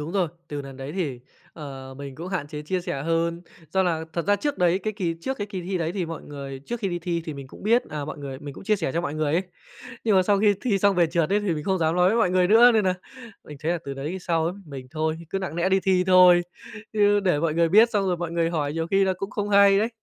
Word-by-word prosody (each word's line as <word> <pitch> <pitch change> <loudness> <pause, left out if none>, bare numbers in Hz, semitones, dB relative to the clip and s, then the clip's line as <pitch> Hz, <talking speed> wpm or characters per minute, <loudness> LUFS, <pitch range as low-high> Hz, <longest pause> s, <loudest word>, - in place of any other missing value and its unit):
đúng 155 +4 -5
rồi, 185 -5 +1 0.2
từ 145 -1 -4
lần 135 -1 -10
đấy 135 +2 -7
thì, 150 -9 -3 0.3
ờ, 135 -3 -9
mình 140 -2 -7
cũng 170 +6 -7
hạn 185 -6 -3
chế 150 -1 -6
chia 180 +4 -2
sẻ 140 -5 -4
hơn 165 +2 -1 0.3
do 190 - +2
là 165 -3 0
thật 170 0 -3
ra 205 0 +4
trước 290 +6 -2
đấy 180 +1 +3
cái 215 +1 -3
kỳ 180 -5 -2
trước 265 +8 -3
cái 205 - -3
kỳ 195 -3 -5
thi 185 +1 -3
đấy 165 0 -2
thì 185 -3 -2
mọi 165 -1 -6
người 140 -2 -8
trước 240 -1 -4
khi 195 - -1
đi 175 - -2
thi 170 -1 -2
thì 155 -3 -5
mình 140 -1 -8
cũng - - -14
biết, 230 +4 +3
à, 150 -1 -4
mọi 150 - -7
người 135 -2 -6
mình 145 0 -8
cũng - - -11
chia 215 +1 +2
sẻ 160 -8 -2
cho 170 - 0
mọi 150 -4 -4
người 155 -1 0
ấy 175 - +2 0.6
nhưng 215 -4 +3
mà 185 - +5
sau 200 +2 +2
khi 205 -1 +4
thi 215 -6 +1
xong 200 0 +3
về 175 -1 +4
trượt 165 0 0
ấy 205 +1 +3
thì 195 -5 0
mình 150 -1 -5
không 190 -1 +1
dám 160 0 +1
nói 180 0 +4
với 220 - +2
mọi 180 - +3
người 180 -1 +3
nữa 235 +4 +7
nên 220 -3 +2
nà 185 - +2 0.5
mình 150 - -10
thấy 160 +2 0
là 175 - -1
từ 140 - -5
đấy 150 +7 -4
sau 165 -2 0
ấm 190 +4 -5
mình 135 -3 -9
thôi, 155 +1 -2
cứ 195 - -1
nặng 190 -4 -5
lẽ 175 +2 +1
đi 190 0 +3
thi 185 -1 +2
thôi 180 -1 +7 0.5
chứ 205 -1 +3
để 180 -7 +1
mọi 160 -1 0
người 170 0 +3
biết 220 +7 +6
xong 200 -3 0
rồi 180 -1 +1
mọi 170 -1 -4
người 170 -1 +1
hỏi 150 -4 -1
nhiều 165 +1 -2
khi 195 0 +4
là 190 - +1
cũng 195 - -4
không 205 0 -3
hay 200 -1 +6
đấy. 220 +3 +1
175 Hz, 305 wpm, -24 LUFS, 155-195 Hz, 0.6 s, nữa